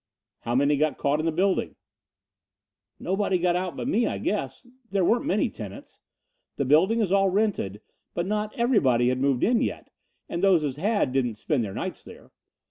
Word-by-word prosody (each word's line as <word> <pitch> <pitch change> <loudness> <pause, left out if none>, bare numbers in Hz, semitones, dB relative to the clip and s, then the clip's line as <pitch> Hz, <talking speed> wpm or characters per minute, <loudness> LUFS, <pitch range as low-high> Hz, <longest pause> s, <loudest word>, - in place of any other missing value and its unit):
"How 120 - -3
many 140 +2 +3
got 150 -1 0
caught 145 +1 0
in 160 - -1
the - - +2
building?" 185 +4 0 1.2
"Nobody 190 0 0
got 175 0 +1
out 180 0 -3
but - - -4
me, 240 -3 +2
I - - -2
guess. - - -3 0.2
There 195 -2 +1
weren't 240 +8 +1
many - - +2
tenants. - - -10 0.6
The 140 - 0
building 185 - +4
is 195 -4 0
all 195 0 +4
rented, 190 - -1 0.3
but 170 - -1
not 210 +2 -2
everybody 135 - +3
had 130 0 -1
moved 135 -2 +1
in 235 0 +3
yet - - -4 0.4
and 170 - -4
those 185 -5 +4
as 140 -2 -3
had 200 - 0
didn't 125 -4 0
spend 130 +3 -1
their 100 -3 -6
nights - - -5
there. - - -14
175 Hz, 185 wpm, -25 LUFS, 140-205 Hz, 1.2 s, building